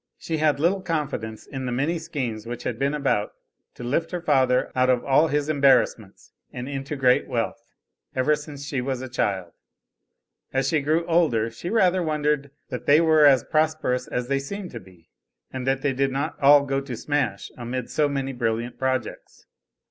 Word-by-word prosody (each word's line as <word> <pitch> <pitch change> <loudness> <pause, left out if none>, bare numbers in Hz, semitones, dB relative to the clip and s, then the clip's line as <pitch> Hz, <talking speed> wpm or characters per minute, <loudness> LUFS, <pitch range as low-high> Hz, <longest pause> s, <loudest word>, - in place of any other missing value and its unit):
She 160 - -3
had 150 -2 +2
little 180 +5 +2
confidence 145 - -3
in 135 -2 -5
the - - -2
many 145 +7 0
schemes 125 -9 -4
which 120 0 -6
had 115 -1 -3
been 140 +2 +1
about 135 -8 0 0.4
to - - -9
lift 145 +7 -1
her 180 - -3
father 130 -5 +2
out 130 0 +3
of 125 -1 +2
all 145 +4 +4
his 145 0 0
embarrassments 135 -8 +2 0.2
and 125 0 -6
into 140 +1 -4
great 130 -2 +3
wealth, 115 0 -2 0.5
ever 135 +4 +3
since 150 -2 -9
she 140 -3 -2
was 130 0 -3
a - - -5
child; 95 -8 -2 1.0
as 135 0 0
she 155 -1 +1
grew 155 +4 +1
older, 150 -10 +2
she 145 +9 -6
rather 185 -4 +3
wondered 150 -3 0 0.2
that - - -6
they 145 +2 +7
were 155 -2 +5
as 135 -4 +5
prosperous 155 -5 0
as 125 0 -3
they 135 +1 +1
seemed 185 +7 -6
to 115 - -7
be, 90 -4 -20 0.4
and 130 -1 -4
that 135 0 0
they 140 -2 +1
did 135 +1 0
not 140 +4 -2
all 140 0 +7
go 135 0 -1
to 130 -4 -6
smash 135 -9 -2
amid 125 0 -5
so 150 -2 +2
many 135 -1 -2
brilliant 120 0 -2
projects. 130 -3 -3
135 Hz, 185 wpm, -24 LUFS, 125-150 Hz, 1.0 s, they